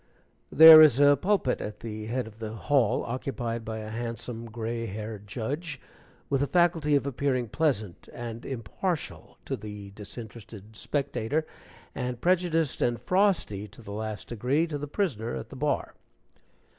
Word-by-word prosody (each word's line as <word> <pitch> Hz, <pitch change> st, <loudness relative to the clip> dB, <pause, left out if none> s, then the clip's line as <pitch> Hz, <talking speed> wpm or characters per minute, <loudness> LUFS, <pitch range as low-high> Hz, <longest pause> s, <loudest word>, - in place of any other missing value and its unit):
There 160 Hz, 0 st, +11 dB
is 145 Hz, -5 st, +7 dB
a 145 Hz, 0 st, +7 dB
pulpit 180 Hz, -3 st, 0 dB
at 105 Hz, -, -6 dB
the 110 Hz, -1 st, -6 dB
head 125 Hz, +2 st, -2 dB
of 110 Hz, 0 st, -13 dB
the 110 Hz, -1 st, -5 dB
hall, 125 Hz, 0 st, +1 dB
occupied 120 Hz, -2 st, -3 dB
by 110 Hz, 0 st, -5 dB
a 110 Hz, 0 st, -6 dB
handsome 115 Hz, 0 st, -5 dB
gray 115 Hz, +1 st, -4 dB
haired 105 Hz, 0 st, -7 dB
judge, 140 Hz, -, -4 dB, 0.5 s
with 135 Hz, -1 st, 0 dB
a 140 Hz, -, +1 dB
faculty 165 Hz, -4 st, +3 dB
of 140 Hz, -, +1 dB
appearing 130 Hz, -3 st, -1 dB
pleasant 110 Hz, -, -1 dB
and 120 Hz, -1 st, -7 dB
impartial 135 Hz, -, -4 dB
to 135 Hz, -, -2 dB
the 105 Hz, -3 st, -9 dB
disinterested 110 Hz, 0 st, -10 dB
spectator, 145 Hz, +3 st, -1 dB, 0.5 s
and 125 Hz, -1 st, -4 dB
prejudiced 170 Hz, -3 st, +1 dB
and 120 Hz, -1 st, +1 dB
frosty 185 Hz, -, +1 dB
to 110 Hz, +4 st, -15 dB
the 100 Hz, -, -9 dB
last 110 Hz, 0 st, -5 dB
degree 125 Hz, +8 st, +1 dB
to 150 Hz, -3 st, -4 dB
the 145 Hz, -, -5 dB
prisoner 140 Hz, -, -2 dB
at 65 Hz, -, -6 dB
the -, -, -10 dB
bar. -, -, -1 dB
120 Hz, 155 wpm, -28 LUFS, 110-145 Hz, 0.5 s, There